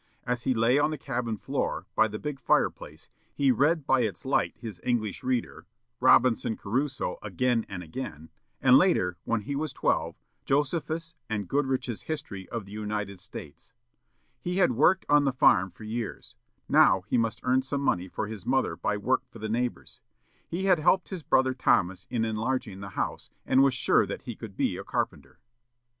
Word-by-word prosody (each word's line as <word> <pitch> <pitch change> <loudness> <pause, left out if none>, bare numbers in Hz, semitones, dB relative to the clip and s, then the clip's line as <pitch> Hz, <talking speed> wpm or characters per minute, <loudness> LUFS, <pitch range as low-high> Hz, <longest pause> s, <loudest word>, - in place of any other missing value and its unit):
As 125 0 -2
he 130 -2 +2
lay 115 +5 +3
on 150 - +3
the 155 - -3
cabin 120 -4 -3
floor, - - -2
by 110 - +4
the 105 0 -5
big 145 +2 -5
fireplace, - - 0 0.3
he 140 -2 +3
read 145 +5 +2
by 130 -2 +3
its 110 0 -3
light 135 - +1
his 105 -7 -7
"English 115 -5 -1
Reader," 125 -2 -2 0.3
"Robinson 115 -3 +4
Crusoe" 130 +6 -2
again 115 +4 0
and 90 -3 -6
again, 80 - -7 0.3
and, 130 -1 +8
later, 90 - +2
when 115 -2 0
he 140 +7 -4
was 150 0 -2
twelve, - - 0 0.3
"Josephus," 160 +4 -1 0.2
and 105 -3 -2
"Goodrich's 130 -4 -1
History 100 -12 -6
of 115 -4 -4
the 100 - -14
United 105 -2 -4
States." 80 -5 -10 0.7
He 180 +8 -3
had 180 -7 +4
worked 160 +10 +3
on 145 0 +5
the 135 - +3
farm 95 -7 +4
for 90 +5 -14
years; 110 +1 -5 0.3
now 95 0 +5
he 105 +6 0
must 115 -1 -1
earn 130 +1 +3
some 140 +1 -3
money 90 -9 +1
for 105 - -3
his 105 -3 -7
mother 130 +5 +1
by 105 - -1
work 125 +6 +1
for - - -13
the 110 0 -5
neighbors. 120 +2 -3 0.5
He 180 +3 -3
had 180 -4 +4
helped 180 +4 +3
his 185 -4 -5
brother 130 -3 +2
Thomas 95 -7 +1
in 115 -2 0
enlarging 110 -2 -2
the 100 0 -7
house, - - -3 0.2
and 130 0 +4
was 135 -2 +4
sure - - +3
that - - -6
he - - -6
could - - -10
be - - 0
a - - -6
carpenter. - - -3
125 Hz, 180 wpm, -28 LUFS, 105-135 Hz, 0.7 s, and